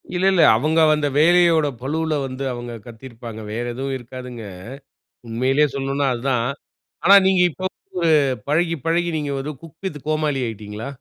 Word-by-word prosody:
இல்லல்ல. 185 -1 +3 0.2
அவுங்க 155 +6 +1 0.2
அந்த 150 -1 0
வேலையோட 170 -1 +5
பளுவுல 160 +4 -1
வந்து, 130 +1 -5
அவுங்க 120 -1 -6
கத்திருப்பாங்க. 115 -2 -9
வேற 120 +3 -3
எதுவும் 135 +2 -3
இருக்காதுங்க. 125 -1 -9 0.8
உண்மையிலயே 130 +6 +2
சொல்லனும்னா 135 +1 -1
அதான். 120 -1 0 0.6
ஆனா, 200 - +8
நீங்க 190 -1 +3
இப்பப்ப 185 +4 -4 0.8
பழகி, 165 +3 +1
பழகி 170 +1 +1
நீங்க 145 -2 -3
ஒரு 150 - -5
குக் 165 -1 -14
வித் 150 -6 -4
கோமாளி 155 -3 0
ஆகிட்டீங்களா? 110 +2 -7
140 Hz, 135 wpm, -21 LUFS, 120-160 Hz, 0.8 s, ஆனா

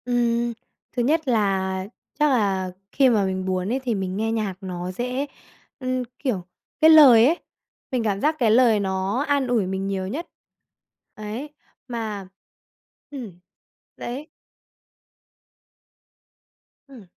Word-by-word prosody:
Ừm. 240 -1 +1 0.4
Thứ 245 - -1
nhất 310 +4 +1
là 190 -4 0 0.3
chắc 300 0 +4
là 195 -6 +1 0.2
khi 270 -2 +4
mà 210 -5 +3
mình 190 0 -2
buồn 185 0 -1
ấy, 265 - 0
thì 240 -4 0
mình 190 -1 -3
nghe 225 +1 0
nhạc 215 -4 -1
nó 180 -1 -5
sẽ 250 +7 -2 0.5
ừm, 255 -1 -1 0.2
kiểu, 205 -10 -2 0.3
cái 315 - +8
lời 270 -8 +9
ấy, 330 +6 +2 0.5
mình 250 -3 0
cảm 200 -2 -1
giác 305 +2 +2
cái 230 -4 +4
lời 230 -2 +5
nó 195 +5 -1
an 285 -2 +1
ủi 235 -5 +1
mình 190 +1 -2
nhiều 190 -1 -2
nhất. 295 - -4 0.9
Ấy, 215 +7 -6 0.4
mà 220 -5 -4 0.8
ừm. 230 -11 -8 0.6
Đấy. 265 +6 -6 2.6
Ừm. 255 -7 -13
225 Hz, 135 wpm, -23 LUFS, 195-255 Hz, 2.6 s, lời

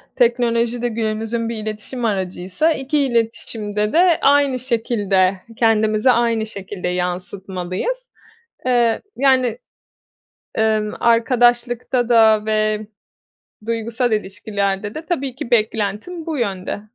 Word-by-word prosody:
teknolojide 240 -1 +1
günümüzün 225 +1 -2
bir 235 - -3
iletişim 215 +3 -4
aracıysa, 190 - 0
2 280 +1 0
iletişimde 225 -4 -1
de 345 0 +4
aynı 280 -2 +3
şekilde, 210 -6 +1 0.2
kendimizi 220 +1 +3
aynı 230 -2 +1
şekilde 195 -3 -6
yansıtmalıyız. 185 - -3 0.6
Eee, 240 -3 +2
yani, 255 -3 +2 1.0
emm, 215 -1 +1
arkadaşlıkta 240 +1 +2
da 220 -2 +5
ve 215 0 0 0.8
duygusal 230 +1 -1
ilişkilerde 200 0 -2
de 315 +1 -6
tabii 275 -7 -2
ki 250 - -7
beklentim 220 - -1
bu 315 -3 -3
yönde. 200 -3 -3
225 Hz, 100 wpm, -20 LUFS, 210-245 Hz, 1.0 s, da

